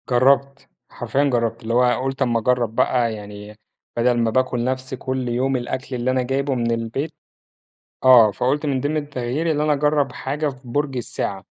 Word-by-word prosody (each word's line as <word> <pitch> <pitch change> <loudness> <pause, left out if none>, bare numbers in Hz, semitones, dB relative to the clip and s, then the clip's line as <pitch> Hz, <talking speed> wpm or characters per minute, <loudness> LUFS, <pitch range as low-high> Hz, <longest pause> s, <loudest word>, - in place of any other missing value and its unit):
جرّبت، 135 +2 +2 0.2
حرفيًا 120 +4 -1
جرّبت، 115 -3 0
اللي 115 +1 -2
هو 125 +1 +3
قُلت 135 +1 -3
أمّا 120 -3 +2
اجرّب 120 -1 0
بقى 120 -2 +2
يعني 105 0 -9 0.4
بدل 120 +1 +2
ما 115 -1 +1
باكل 130 -1 0
نفس 130 +1 -3
كل 130 -1 -3
يوم 130 +3 0
الأكل 130 +2 -4
اللي 125 +1 0
أنا 130 0 +1
جايبه 135 +2 -1
من 120 -1 0
البيت 115 +7 -3 0.9
آه، 120 -4 +8
فقُلت 135 +8 -1
من 135 -3 0
ضِمن 145 +4 -1
التغيير 145 +1 -2
اللي 150 -1 +1
أنا 155 - +2
اجرّب 145 -2 +1
حاجة 150 +1 -2
في 130 -2 -9
برج 140 +1 -1
الساعة، 100 -5 -4
130 Hz, 175 wpm, -21 LUFS, 120-140 Hz, 0.9 s, آه